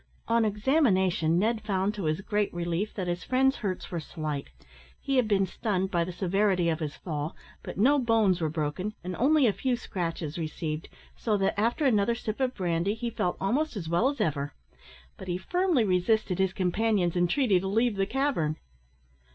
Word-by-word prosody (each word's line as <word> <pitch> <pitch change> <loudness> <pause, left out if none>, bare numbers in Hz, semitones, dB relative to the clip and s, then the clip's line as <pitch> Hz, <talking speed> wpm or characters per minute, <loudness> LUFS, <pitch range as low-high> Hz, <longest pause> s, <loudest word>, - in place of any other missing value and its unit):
On 230 0 +3
examination, 200 - +2
Ned 220 +4 +1
found, 200 -1 0
to 200 -5 -4
his 155 +4 0
great 205 +1 0
relief; 175 +4 -2
that 190 - -2
his 175 0 -2
friend's 265 +1 +2
hurts 190 -4 -4
were 175 - -2
slight. 155 - -5 0.5
He 275 -1 -1
had 250 -3 +3
been 195 -2 +3
stunned 190 0 -2
by 170 -2 +2
the 180 - -5
severity 185 -1 +1
of 160 -1 -1
his 150 -3 -4
fall, 155 -2 -4 0.3
but - - -8
no 275 +8 +4
bones 220 -7 +2
were 160 - +1
broken, 160 +7 -3
and 180 0 -4
only 285 +3 +4
a 215 - +3
few 255 +3 0
scratches 170 -8 -4
received, 155 -1 -4 0.3
so 215 -3 0
that, 195 -1 +1
after 230 +8 +1
another 230 -2 +3
sip 220 -1 -4
of 260 -1 0
brandy, 180 +2 0
he 235 +1 -3
felt 180 -4 -1
almost 270 +9 0
as 180 -6 -5
well 170 +11 +2
as 285 -2 -5
ever. 145 -7 -1 0.6
But 190 - -9
he 175 0 -1
firmly 355 - +1
resisted 185 0 +1
his 190 -1 +2
companion's 190 -1 +1
entreaty 190 +3 +3
to 190 - -4
leave 225 +3 +2
the 195 0 0
cavern. 255 - 0
195 Hz, 185 wpm, -28 LUFS, 175-230 Hz, 0.6 s, no